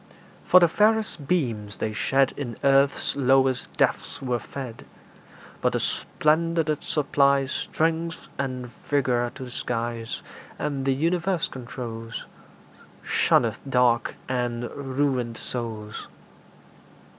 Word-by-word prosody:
For 185 - +8
the 175 - +6
fairest 210 -5 +2
beams 115 - -1
they 110 - -2
shed 135 +5 +2
In 120 -6 -5
earth's 140 0 +3
lowest 135 -1 +2
depths - - +1
were 125 -2 -1
fed; 125 0 -7 0.8
But - - +2
the - - +1
splendour 165 +2 +1
that 150 -1 -1
supplies 140 -2 +2
Strength 165 +1 -1
and 130 -3 -3 0.2
vigour 125 -4 +1
to 135 - -7
the 125 - -8
skies, 115 -1 -3 0.3
And 140 -2 -2
the 135 - +3
universe 170 +3 +1
controls, 115 -3 -7 0.8
Shunneth - - +2
dark 125 -2 +3
and 120 -2 -2
ruined 130 -4 -1
souls. 110 -3 -5
135 Hz, 110 wpm, -25 LUFS, 120-150 Hz, 0.8 s, For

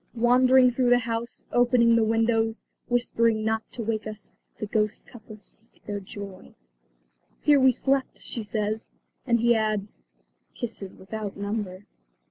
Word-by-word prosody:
Wandering 250 +2 +5
through 245 0 +1
the 245 - +6
house, 230 0 -4
opening 240 -1 +4
the 230 - +4
windows, 225 0 +1 0.2
whispering 230 -2 +1
not 220 0 +1
to 235 - -4
wake 220 0 -2
us, 215 -1 -8 0.3
the - - -2
ghostly 210 0 -2
couple 220 -2 -12
seek 220 +2 -13
their 205 -1 -3
joy. 200 -1 -10 0.9
"Here 295 -1 +5
we 260 0 +6
slept," 270 +2 0
she 235 - -6
says. 215 +1 -2 0.4
And 235 -1 +3
he 235 0 +5
adds, 215 -2 -1 0.5
"Kisses 205 -5 -6
without 205 +1 -6
number." 200 -2 -4
225 Hz, 140 wpm, -26 LUFS, 215-240 Hz, 0.9 s, the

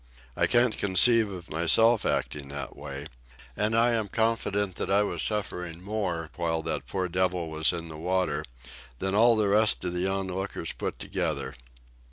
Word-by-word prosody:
I - - +2
can't 120 -1 +2
conceive 110 +3 +5
of 90 -3 -9
myself 110 +9 +3
acting 70 -2 -2
that 70 -2 -7
way, 70 +1 -7 0.5
and 110 +2 +1
I 120 +1 +5
am 110 -3 0
confident 105 -3 0
that - - -2
I 100 +1 +4
was 90 -5 -2
suffering 90 -5 -2
more 90 -5 -3
while 80 -2 -1
that - - -4
poor 95 -1 -2
devil 90 -2 -1
was 80 +1 +3
in 85 -2 -5
the 80 - -8
water 90 -3 -1 0.5
than 95 +8 -2
all 115 +3 +5
the 105 -2 +1
rest 105 0 +3
of 90 -1 -2
the 90 +1 -1
onlookers 95 -2 -3
put - - -4
together." - - -3
95 Hz, 170 wpm, -27 LUFS, 85-105 Hz, 0.5 s, conceive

